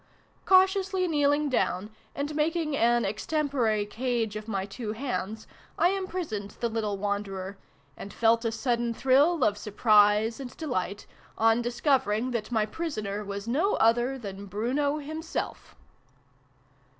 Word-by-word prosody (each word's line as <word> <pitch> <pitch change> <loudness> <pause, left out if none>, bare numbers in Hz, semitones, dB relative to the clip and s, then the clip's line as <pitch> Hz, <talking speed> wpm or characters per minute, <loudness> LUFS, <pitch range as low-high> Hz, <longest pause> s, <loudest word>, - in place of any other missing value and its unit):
Cautiously 380 0 +4
kneel 290 -3 +3
ing 295 +1 +1
down, 210 -6 -1 0.2
and 285 +2 -3
making 310 0 0
an 240 -2 +3
ex 205 +2 -3
tempore 265 -9 +1
cage 230 -1 -2
of 215 +1 -6
my 195 -3 -2
two 210 +2 -5
hands, 220 -3 -4 0.3
I 350 - +4
imprisoned 360 - -4
the 235 - 0
little 215 -3 -2
wanderer, 195 -1 -3 0.4
.and 200 - -9
felt 230 0 +3
a 230 - 0
sudden 235 0 -1
thrill 280 +5 +3
of 205 -1 +2
surprise 210 +1 +3
and 260 -2 -8
delight 205 - -3 0.3
on 225 +1 +4
discovering 240 -2 +1
that 230 -1 -3
my 220 -3 +2
prisoner 215 -7 -4
was 200 +1 -6
no 320 - +1
other 240 +4 +2
than 200 -4 -8
Bruno 260 +9 0
himself! 315 +2 -5
235 Hz, 140 wpm, -28 LUFS, 210-290 Hz, 0.4 s, Cautiously